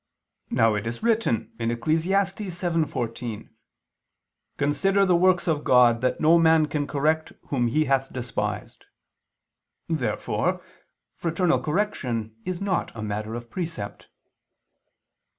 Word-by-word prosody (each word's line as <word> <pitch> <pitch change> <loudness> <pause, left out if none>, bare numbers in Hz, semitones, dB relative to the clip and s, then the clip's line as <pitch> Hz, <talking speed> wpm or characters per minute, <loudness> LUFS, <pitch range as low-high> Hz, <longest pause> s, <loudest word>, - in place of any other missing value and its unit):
Now 115 -1 +3
it 105 +1 -2
is 120 - -5
written 225 - +1
(Eccles. 120 +8 0
7:14): 170 - -2 1.1
"Consider 195 +8 +2
the 180 -2 +4
works 180 +1 +3
of 155 -3 +1
God, 120 -2 +5
that 130 - 0
no 165 +2 +5
man 160 -1 +5
can 150 -1 -2
correct 155 +2 0 0.2
whom 125 -4 +1
He 155 +7 +2
hath 135 -1 +1
despised." 125 -1 -4 1.0
Therefore 155 -7 -1 0.5
fraternal 170 +1 +1
correction 130 - -2
is 185 -1 -3
not 200 -3 -1
a 110 - -5
matter 105 +1 -3
of 120 -1 -8
precept. 165 - -5
150 Hz, 115 wpm, -25 LUFS, 120-175 Hz, 1.1 s, God